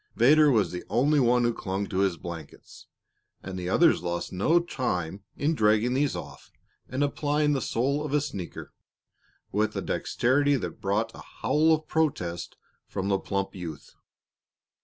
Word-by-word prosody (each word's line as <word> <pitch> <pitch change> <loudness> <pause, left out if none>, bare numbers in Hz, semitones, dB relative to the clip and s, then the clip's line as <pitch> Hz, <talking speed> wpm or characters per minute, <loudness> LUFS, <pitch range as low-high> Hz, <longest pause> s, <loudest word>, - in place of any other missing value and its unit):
Vedder 150 +7 +6
was 105 -10 +2
the 90 - -5
only 145 +5 +3
one 125 -1 +3
who 120 0 +2
clung 100 -2 -3
to 95 -1 -3
his 95 -3 +1
blankets, 85 -2 -10 0.6
and 95 0 -6
the 90 -1 -4
others 165 - +4
lost 85 +1 -3
no 155 - +3
time 100 - -3
in 150 +3 +1
dragging 110 -1 +3
these 140 +1 +1
off - - -9 0.4
and 130 +3 0
applying 150 +1 +1
the 135 - 0
sole 140 +5 0
of 150 - -4
a 150 - +3
sneaker 100 -11 -6 0.8
with 105 +1 0
a 95 - -1
dexterity 140 +10 +1
that 125 - -5
brought 105 +3 0
a - - -11 0.2
howl 150 +7 +3
of 155 -1 +1
protest 90 - -1 0.3
from 100 0 -3
the 100 -1 +2
plump 100 0 -3
youth. 80 -5 -8
115 Hz, 160 wpm, -27 LUFS, 95-145 Hz, 0.8 s, Vedder